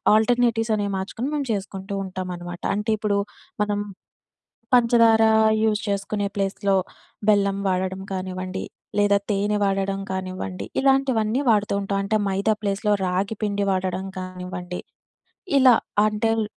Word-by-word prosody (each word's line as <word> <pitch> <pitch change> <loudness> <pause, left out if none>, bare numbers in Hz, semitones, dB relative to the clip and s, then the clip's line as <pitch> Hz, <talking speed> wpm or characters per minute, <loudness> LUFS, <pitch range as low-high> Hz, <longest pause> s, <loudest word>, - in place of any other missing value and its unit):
ఆల్టర్‌నేటివ్సనేవి 225 -2 +2
మార్చుకొని, 225 +6 -4
మేము 285 -2 -1
చేసుకుంటూ 195 -1 -5
ఉంటామనమాట. 180 -2 -6
అంటే 210 +2 -2
ఇప్పుడు, 205 -1 +1 0.5
మనం 205 0 -1 0.9
పంచదారా 230 -2 +5 0.3
యూజ్ 215 -1 +2
చేసుకునే 200 0 -1
ప్లేస్‌లో 195 0 0 0.5
బెల్లం 200 -2 +3
వాడడం 190 0 -1
కానివ్వండి, 185 0 -4 0.3
లేదా 205 0 +4
తేనె 205 +1 +1
వాడడం 195 0 0
కానివ్వండి, 185 0 -4 0.2
ఇలాంటివన్నీ 265 -3 +2
వాడుతూ 210 -2 +2
ఉంటాం. 195 0 -1
అంటే 210 +2 +1
మైదా 195 +3 +1
ప్లేస్‌లో, 205 +1 0
రాగి 190 +4 -1
పిండి 200 -1 0
వాడడం 185 0 -1
కానివ్వండి, 180 -1 -6 0.8
ఇలా 255 -2 +7 0.3
అంటెల్ 220 +1 +1
200 Hz, 110 wpm, -23 LUFS, 190-220 Hz, 0.9 s, ఇలా